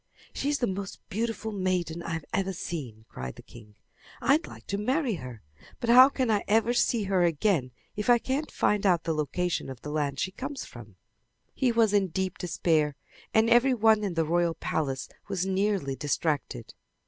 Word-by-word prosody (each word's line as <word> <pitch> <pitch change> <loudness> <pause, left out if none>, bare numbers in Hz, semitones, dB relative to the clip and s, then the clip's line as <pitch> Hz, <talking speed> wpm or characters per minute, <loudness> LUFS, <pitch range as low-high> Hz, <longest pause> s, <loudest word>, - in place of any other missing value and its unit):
"She 285 - -2
is 290 - +1
the 245 - 0
most 195 -1 -4
beautiful 220 +1 -2
maiden 185 -4 -1
I 165 - -4
have 160 -2 -4
ever 195 0 0
seen!" 130 -11 -6
cried 65 0 -7
the - - -13
king. 105 -3 -15 0.4
"I'd 275 +7 +2
like - - -12
to 200 - -3
marry 255 +3 0
her, 125 -3 -9 0.4
but 235 - +1
how 255 +2 +9
can 255 -4 0
I 205 -1 +1
ever 225 +3 +3
see 235 -2 +2
her 190 -2 +1
again 165 -4 +1 0.3
if 210 +3 -3
I 240 - +7
can't 270 +6 -2
find 210 -1 +1
out 180 -4 +3
the 165 - -1
location 155 +2 -2
of 130 -2 -8
the 150 - -5
land 145 -2 -1
she 190 - -1
comes 270 +6 -6
from!" 110 -5 -12 0.6
He 255 -3 +1
was 225 -3 +3
in 200 -2 +3
deep 185 +1 -3
despair, 160 -4 +1 0.4
and 220 +1 +4
every 240 +3 +5
one 220 -1 +4
in 190 -4 -2
the 165 -1 +1
royal 170 +1 +1
palace 135 -4 -2 0.2
was 190 -2 -1
nearly 190 -7 0
distracted. 145 -4 -2
190 Hz, 190 wpm, -28 LUFS, 155-225 Hz, 0.6 s, how